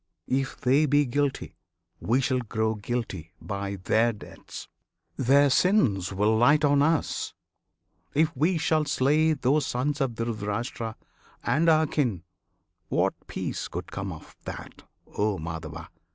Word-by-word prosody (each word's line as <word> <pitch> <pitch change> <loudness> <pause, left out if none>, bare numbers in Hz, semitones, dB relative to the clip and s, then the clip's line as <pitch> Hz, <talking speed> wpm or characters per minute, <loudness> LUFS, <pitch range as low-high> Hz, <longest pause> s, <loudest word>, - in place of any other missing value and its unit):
If 135 +1 -1
they 140 +4 +3
be 145 +1 +4
Guilty, 140 +2 -2 0.4
we 125 +5 +1
shall 130 0 +1
grow 110 -2 -1
guilty 105 -7 -4
by 100 -1 -4
their 110 +5 +2
deaths; 105 - -10 0.5
Their 140 +2 +4
sins 130 - +3
will 105 +3 +2
light 145 +7 +5
on 145 0 +4
us, 160 +1 0 0.8
if 155 +1 +2
we 165 +7 +2
shall 155 -1 +1
slay 150 +4 +3
Those 145 0 +1
sons 145 +4 -1
of 130 -4 0
Dhritirashtra, 115 0 -3 0.5
and 160 +4 +2
our 160 0 +5
kin; 120 - -1 0.7
What - - +2
peace - - -4
could - - -6
come - - -4
of - - -11
that, - - -8 0.4
O 105 -1 +1
Madhava? 80 0 -6
125 Hz, 135 wpm, -27 LUFS, 105-145 Hz, 0.8 s, light